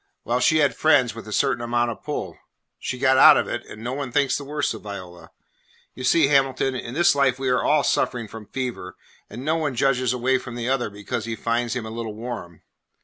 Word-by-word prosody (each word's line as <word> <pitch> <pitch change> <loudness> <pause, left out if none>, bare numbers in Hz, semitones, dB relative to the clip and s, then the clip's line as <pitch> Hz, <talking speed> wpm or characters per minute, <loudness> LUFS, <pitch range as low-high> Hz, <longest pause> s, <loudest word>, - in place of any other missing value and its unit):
Well, 120 +2 0
she 155 +5 +3
had 145 -3 +2
friends 140 -7 +3
with 115 -1 -10
a - - -8
certain 120 +2 +1
amount 120 0 0
of - - -9
pull. - - -5 0.4
She 125 - -4
got 130 0 +3
out - - +9
of - - 0
it, - - -4
and 110 - -10
no 120 +2 -3
one 135 -2 -4
thinks 140 0 +2
the 145 - -4
worse 145 -1 -2
of 110 - -9
Viola. 90 -4 -9 0.6
You 130 - -8
see, 155 +4 +4
Hamilton, 135 -1 +2
in 125 -1 -6
this 175 +2 +4
life 140 -3 +2
we 135 -1 -2
are 125 - +2
all 150 -1 +3
suffering 120 -2 0
from 105 0 -10
fever, 125 -9 -5 0.3
and 120 +5 -8
no 160 +2 +1
one 150 -4 -1
edges 130 -1 +1
away 125 +1 +1
from 125 -2 -9
the 120 0 -4
other 130 -3 0
because 100 +1 -5
he 115 -1 -3
finds 115 +2 -1
him 120 -3 -3
a 110 - -7
little 115 -2 -5
warm. 110 -8 -7
125 Hz, 230 wpm, -23 LUFS, 115-135 Hz, 0.6 s, out